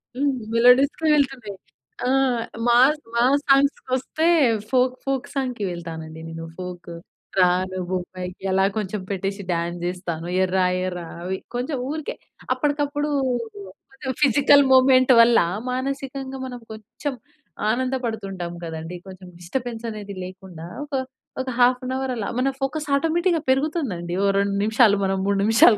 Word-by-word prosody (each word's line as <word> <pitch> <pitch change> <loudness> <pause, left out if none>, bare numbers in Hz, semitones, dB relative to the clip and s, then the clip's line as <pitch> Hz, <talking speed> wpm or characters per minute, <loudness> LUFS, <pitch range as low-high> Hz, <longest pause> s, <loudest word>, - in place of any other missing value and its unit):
హ్మ్. 280 +1 +1 0.2
మెలోడీస్‌కే 250 +6 +4
వెళ్తున్నా, 265 -7 0 0.6
ఆ! - - +2 0.6
మాస్ 260 +6 +5 0.2
మాస్ 260 +4 +3
సాంగ్స్‌కొస్తే 275 +2 +2 0.4
ఫోక్ 255 0 +3
ఫోక్ 270 -2 -1
సాంగ్‌కి 255 -5 -2
వెళ్తాను 165 -2 -6
అండి 160 +1 -10
నేను. 165 0 -7
ఫోక్ 180 -1 -7 0.5
'రాను 185 +1 +2
బొంబాయికి' 180 0 -5
అలా 190 +1 +3
కొంచెం 210 -1 -3
పెట్టేసి 195 +1 -3
డాన్స్ 170 0 -2
జేస్తాను. 175 -2 -4
'ఎర్రా 185 0 +2 0.2
ఎర్రా' 180 -2 -4 0.2
అవి 190 +1 -2 0.2
కొంచెం 255 +4 -2
ఊరికే, 310 0 -4 0.4
అప్పడికప్పుడు 290 0 -1 0.8
కొంచెం 270 0 -5
ఫిజికల్ 285 +1 +6
మూమెంట్ 260 0 +6
వల్ల, 230 0 +6 0.3
మానసికంగా 270 0 -4
మనం 250 -1 -7
కొంచెం 220 +6 -6 0.6
ఆనంద 255 +3 0
పడుతుంటాం 195 -6 -4
గదండీ! 165 +1 -6
కొంచెం 185 -1 -11
డిస్టర్బెన్స్ 235 +5 -4
అనేది 205 -2 -7
లేకుండా 185 -3 -10 0.2
ఒక 290 -1 -5 0.5
ఒక 260 - -4
హాఫ్ 250 +1 +4
అన్ 255 - -3
అవర్ 265 -1 -2
అలా 225 -4 -3
మన 265 +2 +2
ఫోకస్ 295 +3 -2
ఆటోమేటిక్‌గా 330 +3 +1
పెరుగుతుందండి. 260 - 0
ఓ - - +3
2 200 0 +1
నిమిషాలు, 220 -1 +5
మనం 195 0 +1
3 200 0 +1
నిమిషాలు 220 0 +6
235 Hz, 135 wpm, -23 LUFS, 185-270 Hz, 0.8 s, ఫిజికల్